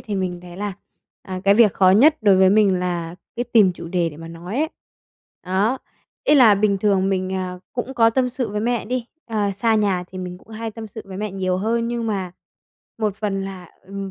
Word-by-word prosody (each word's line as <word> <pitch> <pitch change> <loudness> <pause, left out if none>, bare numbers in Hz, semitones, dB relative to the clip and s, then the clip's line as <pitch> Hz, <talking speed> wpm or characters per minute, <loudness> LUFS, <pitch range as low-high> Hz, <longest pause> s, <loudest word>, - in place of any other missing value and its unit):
thì 210 - -5
mình 185 -2 -2
thấy 175 0 -11
là, 205 0 -3 0.5
à, 185 -1 -6
cái 200 0 +6
việc 215 -3 +5
khó 185 -1 +5
nhất 280 +11 +6
đối 200 -3 +5
với 190 0 +5
mình 195 -3 +4
là 175 -2 -3 0.2
cái 240 - -1
tìm 205 -5 +6
chủ 170 -1 -9
đề 175 -1 0
để 150 - -12
mà 165 +1 -9
nói 175 +7 -7
ấy. 315 +1 +1 0.8
Đó, 200 +8 +1 0.5
ý 295 - +5
là 240 -7 +7
bình 200 -1 +1
thường 195 -1 +2
mình, 185 -1 -1
à, 185 -1 -3
cũng 250 +2 -4
có 225 -2 +5
tâm 250 +2 +1
sự 250 -1 -3
với 210 0 -3
mẹ 240 +1 0
đi, 245 +1 -3 0.2
ờ, 210 -3 0
xa 225 +1 +2
nhà 195 -4 +1
thì 185 - -9
mình 180 -1 -6
cũng - - -24
hay 225 0 -5
tâm 220 0 -8
sự 220 +1 -9
với 190 -1 -9
mẹ 210 +1 -3
nhiều 185 -1 -1
hơn, 230 +4 0
nhưng 235 -1 -2
mà 190 -4 -2 0.7
một 210 -3 -1
phần 195 -3 -2
là 185 -3 -8 0.2
ừm, 195 0 -6
200 Hz, 230 wpm, -21 LUFS, 185-225 Hz, 0.8 s, là